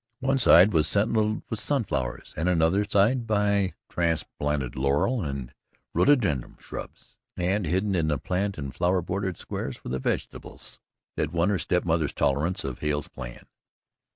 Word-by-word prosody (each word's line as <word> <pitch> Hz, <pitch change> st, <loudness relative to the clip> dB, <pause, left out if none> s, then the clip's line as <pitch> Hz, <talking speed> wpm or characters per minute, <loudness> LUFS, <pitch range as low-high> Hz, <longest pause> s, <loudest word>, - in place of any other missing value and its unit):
One 135 Hz, +1 st, +1 dB
side 100 Hz, -3 st, +7 dB
was 80 Hz, -1 st, +3 dB
sentinelled 110 Hz, +2 st, +1 dB
by -, -, -3 dB
sun 135 Hz, +4 st, 0 dB
flowers 60 Hz, -, -4 dB
and 80 Hz, +4 st, 0 dB
another 85 Hz, +3 st, +3 dB
side 110 Hz, +4 st, +2 dB
by 100 Hz, -2 st, +1 dB
transplanted 75 Hz, -5 st, -1 dB
laurel 70 Hz, -, +1 dB
and 70 Hz, -5 st, -4 dB, 0.4 s
rhododendron 100 Hz, -, +2 dB
shrubs, -, -, -10 dB, 0.2 s
and 90 Hz, +1 st, 0 dB
hidden 95 Hz, +5 st, +1 dB
in 85 Hz, -4 st, +1 dB
the 75 Hz, -2 st, +1 dB
plant 95 Hz, +6 st, -2 dB
and 70 Hz, -3 st, -5 dB
flower 90 Hz, 0 st, +1 dB
bordered 95 Hz, 0 st, -2 dB
squares -, -, -5 dB
were -, -, -5 dB
the 65 Hz, -, -1 dB
vegetables -, -, -4 dB, 0.4 s
that 75 Hz, 0 st, 0 dB
won 85 Hz, +2 st, +2 dB
her 100 Hz, -3 st, +1 dB
step 90 Hz, +2 st, 0 dB
mother's 80 Hz, -3 st, +1 dB
tolerance 80 Hz, +7 st, 0 dB
of 65 Hz, -2 st, -5 dB
Hale's 75 Hz, -1 st, -1 dB
plan. -, -, -9 dB
90 Hz, 155 wpm, -26 LUFS, 75-100 Hz, 0.4 s, side